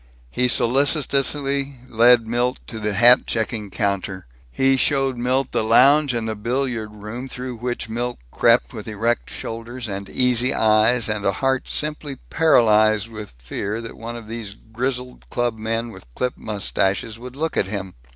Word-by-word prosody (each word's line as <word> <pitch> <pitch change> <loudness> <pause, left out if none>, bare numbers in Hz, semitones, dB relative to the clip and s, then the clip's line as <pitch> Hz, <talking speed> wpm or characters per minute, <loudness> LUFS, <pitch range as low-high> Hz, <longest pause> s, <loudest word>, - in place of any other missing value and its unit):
He 125 0 +1
solicitously 140 +2 +2
led 120 0 +5
Milt 120 +3 0
to 110 - -7
the 105 -1 -2
hat 120 +4 +6
checking 110 -2 -2
counter. 100 -2 -2 0.3
He 135 - +3
showed 135 0 +1
Milt 125 +2 0
the - - 0
lounge 135 +5 +5
and 115 -1 -2
the 110 - -1
billiard 120 0 -2
room, 105 +5 -7
through 125 -1 -6
which 120 0 -4
Milt 120 +2 -3
crept - - +3
with - - -8
erect 110 +2 -1
shoulders 115 +2 -6
and 100 -1 -5
easy 125 +1 +2
eyes 110 +2 +3
and 105 -2 -2
a 100 - +2
heart 130 +5 0
simply 150 -2 -3 0.2
paralyzed 110 -8 +4
with 105 - -9
fear 100 - -4
that 115 -1 -8
one 115 +1 -7
of 115 -2 -9
these 110 -3 -6
grizzled 125 +3 -5
clubmen 115 -1 -2
with 95 - -14
clipped 125 0 -2
mustaches 105 +1 -2
would 125 +1 -9
look 160 +3 -2
at 95 - +1
him. 95 -2 -5
115 Hz, 160 wpm, -22 LUFS, 110-125 Hz, 0.3 s, hat